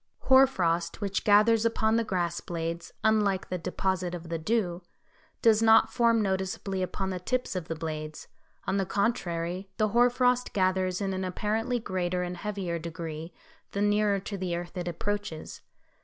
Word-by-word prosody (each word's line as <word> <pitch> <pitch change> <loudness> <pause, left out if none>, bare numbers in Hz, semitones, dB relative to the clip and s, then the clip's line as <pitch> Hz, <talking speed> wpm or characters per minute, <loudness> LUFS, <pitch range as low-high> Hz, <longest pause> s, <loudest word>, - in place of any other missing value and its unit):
] - - -51
Hoar 265 +1 +9
frost 170 -7 -1
which 200 -2 -2
gathers 215 +2 +5
upon 225 -1 +2
the 230 - +2
grass 175 -5 -1
blades, 170 0 -4
unlike 210 -3 +2
the 180 - -2
deposit 185 +1 -1
of 170 -1 -9
the 165 -1 -2
dew, 180 -1 0 0.6
does 220 -1 +5
not 225 0 +5
form 230 -3 +3
noticeably 190 0 -2
upon 190 +1 -2
the 185 - -3
tips 250 +3 -2
of 175 -3 -3
the 165 - -3
blades; 155 -1 -5 0.4
on 190 - 0
the 195 - +1
contrary, 185 -4 -1
the 215 -1 +2
hoar 240 +3 +5
frost 250 0 +1
gathers 185 -1 +1
in 195 -1 -1
an 190 0 -2
apparently 220 +6 -1
greater 180 -4 -2
and 180 0 -4
heavier 190 -4 -3
degree 165 0 -6 0.4
the 200 - -1
nearer 205 -1 +2
to 200 +1 -6
the 180 -2 -2
earth 175 +1 -6
it 175 -1 -4
approaches. 200 -1 -4
190 Hz, 170 wpm, -28 LUFS, 175-215 Hz, 0.6 s, Hoar